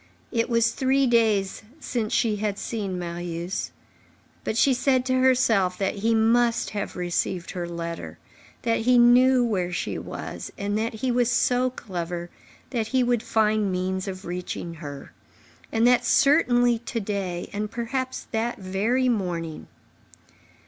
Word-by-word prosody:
It 230 +1 0
was 230 -1 +3
three 270 +1 +2
days 220 -5 +2 0.2
since 235 -7 -3
she 220 -3 +1
had 205 -1 -2
seen 200 -6 -3
Marius. 175 +1 -4 0.7
But 220 - -2
she 270 +3 +4
said 255 0 +2
to 255 0 +1
herself 225 -8 +3
that 195 +1 -1
he 225 +3 +2
must 230 +1 +2
have 205 -1 -4
received 175 0 -2
her 175 -2 -4
letter, 170 -1 -6 0.5
that 230 -2 +1
he 245 +2 +4
knew 245 +1 +6
where 185 -6 -1
she - - -3
was, - - -7
and 200 +1 -2
that 220 +1 -1
he 250 +3 -1
was 245 -1 +2
so 250 0 +2
clever 175 -7 -5 0.4
that 230 -4 -1
he 255 +2 +2
would 240 -2 +1
find 215 -3 +1
means 185 +1 -2
of 190 0 -6
reaching 175 -1 -5
her.—And 155 +8 -6
that 245 0 +5
certainly 245 -4 +4
to 235 0 -4
day, 195 -4 -3
and 210 +1 -2
perhaps 255 +3 -3
that 235 +2 -1
very 215 +7 0
morning. 175 -8 -2
220 Hz, 145 wpm, -25 LUFS, 185-245 Hz, 0.7 s, knew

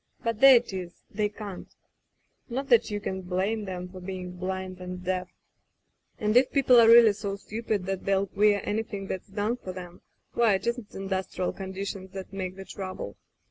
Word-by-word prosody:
But 230 -2 -1
there 270 0 +10
it 235 -4 +2
is. 180 -2 -7
They 210 0 0
can't. 205 -3 -8 0.8
Not 270 +3 -3
that 235 -2 +5
you 205 -1 -2
can 190 -2 -4
blame 195 +3 -1
'em 180 -1 -5
for 185 0 -10
being 180 -1 -6
blind 185 0 -4
and 180 0 -6
deaf.... 185 0 -2 0.9
"And 215 +1 0
if 250 +1 +5
people 260 -3 +6
are 230 - +7
really 230 -2 +8
so 200 -1 -4
stupid 215 -1 -3
that 195 -1 -3
they'll 195 0 +2
queer 205 +1 +3
anything 210 -2 -3
that's 190 0 -5
done 210 +4 -1
for 185 -6 -7
them, 180 -1 -9 0.3
why, 230 -4 +4
it 190 - -4
isn't 235 -2 -3
industrial 190 -1 -2
conditions 190 0 -6
that 190 0 -7
make 185 -1 -4
the 195 0 -9
trouble. 185 - -6
195 Hz, 180 wpm, -27 LUFS, 185-215 Hz, 0.9 s, there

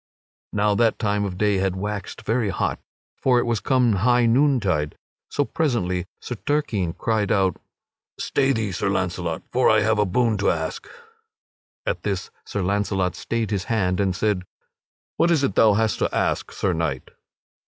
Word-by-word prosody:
Now 105 0 +2
that 115 +1 +2
time 105 -2 0
the - - -1
day 100 +2 +1
had 95 -1 0
waxed 100 0 -5
very 115 -2 0
hot, 90 - -1 0.4
for 125 -2 +3
it 120 - +2
was 115 -3 0
come 125 -4 +2
high 120 +4 +3
noontide, 115 - +2 0.3
so 145 - 0
presently 95 - -1
Sir 120 - -6
Turquine 110 - 0
cried 110 -1 0
out: 95 -3 +2 0.6
"Stay 135 0 +1
thee, 110 -5 -1
Sir 95 +2 -1
Launcelot, 90 -3 -2
for 130 - +3
I 110 -1 +5
have 110 0 +2
a 105 - +4
boon 110 +2 +1
to 100 - +2
ask!" - - -3 1.0
At - - -1
this 455 - -3
Sir - - -3
Launcelot 95 -1 0
stayed 115 -3 -2
his 95 -3 -1
hand 95 -5 0
and 95 -2 +1
said: 105 -1 0 0.8
"What 170 - +3
is 160 -5 +3
it 135 - +1
thou 110 -2 +5
hast 110 0 +1
to - - 0
ask, - - 0
Sir 95 - -1
Knight?" 80 -6 -3
105 Hz, 170 wpm, -23 LUFS, 95-120 Hz, 1.0 s, I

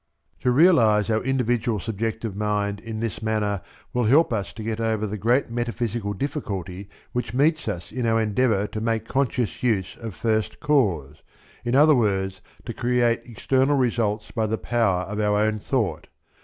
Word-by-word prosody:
To 125 - +1
realize 120 - +4
our 110 - +1
individual 120 -3 0
subjective 115 +1 -3
mind 105 -1 -1
in 110 0 -6
this 115 -2 -3
manner 105 -3 -1 0.3
will 125 -1 +1
help 140 +4 +4
us 100 -3 -2
to 110 - -7
get 115 0 -3
over 110 -1 0
the 105 0 -4
great 115 +5 +1
metaphysical 120 -3 -2
difficulty 100 - -4 0.2
which 120 -2 -3
meets 155 +2 +2
us 90 -5 -4
in 125 -2 -2
our 115 0 +3
endeavour 110 -1 +1
to 110 +1 -5
make 115 -1 -1
conscious 125 -3 -1
use 100 -6 0
of 115 -5 -7
first 110 -2 -1
cause, 95 - +1 0.4
in 120 +1 0
other 150 +2 +7
words 95 -6 0 0.2
to - - -4
create 120 -1 +1
external 130 +4 +1
results 115 -4 0
by 110 -2 0
the 110 +1 -1
power 110 -8 +1
of 105 +3 -5
our 105 -1 +2
own 110 0 +1
thought. 115 -1 -1
110 Hz, 170 wpm, -24 LUFS, 105-125 Hz, 0.4 s, other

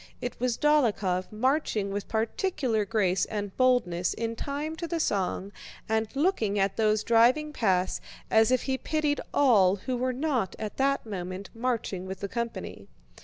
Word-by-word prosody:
It 245 - -5
was 245 -1 0
Dólokhov 210 -11 +2
marching 220 -3 0
with 200 0 -4
particular 225 - 0
grace 195 -4 +1
and 205 -2 -5
boldness 220 -9 +2
in 230 0 -3
time 290 +5 -4
to 335 - -4
the 335 0 -2
song 195 - -1 0.4
and 220 0 +1
looking 275 - +1
at 195 0 +1
those 215 -1 +2
driving 250 +7 +3
past 185 -8 +1 0.3
as 220 0 +5
if 255 -1 +2
he 265 -1 -1
pitied 305 -2 0
all 205 -9 +5
who 250 +6 -4
were 255 +1 0
not 255 -7 -1
at 215 -1 -5
that 275 0 +1
moment 185 -2 -6
marching 225 -6 -2
with 190 0 -6
the 200 - -2
company. 235 +2 -5
225 Hz, 160 wpm, -28 LUFS, 200-265 Hz, 0.4 s, as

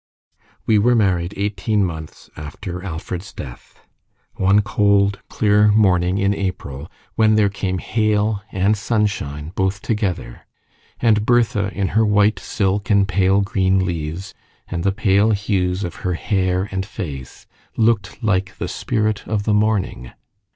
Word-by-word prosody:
We 110 -2 +4
were 120 +4 +3
married 95 -4 +1
eighteen 100 +1 0
months 80 -3 -7
after 85 +5 -7
Alfred's 90 +1 -6
death, - - -11 0.5
one 100 +2 +3
cold, 100 -2 +2
clear 105 -1 +3
morning 95 -4 +3
in 100 0 +2
April, 85 -7 -5 0.2
when 110 -1 +3
there 105 -2 +3
came 95 -1 -3
hail 105 +1 0
and 100 +2 +2
sunshine 100 -9 -2
both 95 +1 -1
together; 100 - -3 0.5
and 110 -3 +3
Bertha, 110 -4 +2
in 95 -1 -2
her 110 +2 +2
white 105 -2 +3
silk 100 0 -1
and 100 -2 +4
pale 95 +1 +2
green 95 -1 +1
leaves, 85 +2 -4 0.3
and 85 -2 -4
the 100 - +2
pale 100 +1 +2
hues 100 -2 -1
of 85 - -5
her 90 -4 -1
hair 95 +1 0
and 95 0 -2
face, 75 - -7 0.3
looked 110 -2 +1
like 95 -3 0
the - - -3
spirit 110 -3 -2
of 105 -2 -1
the 105 - +1
morning. 105 - 0
100 Hz, 140 wpm, -20 LUFS, 90-105 Hz, 0.5 s, We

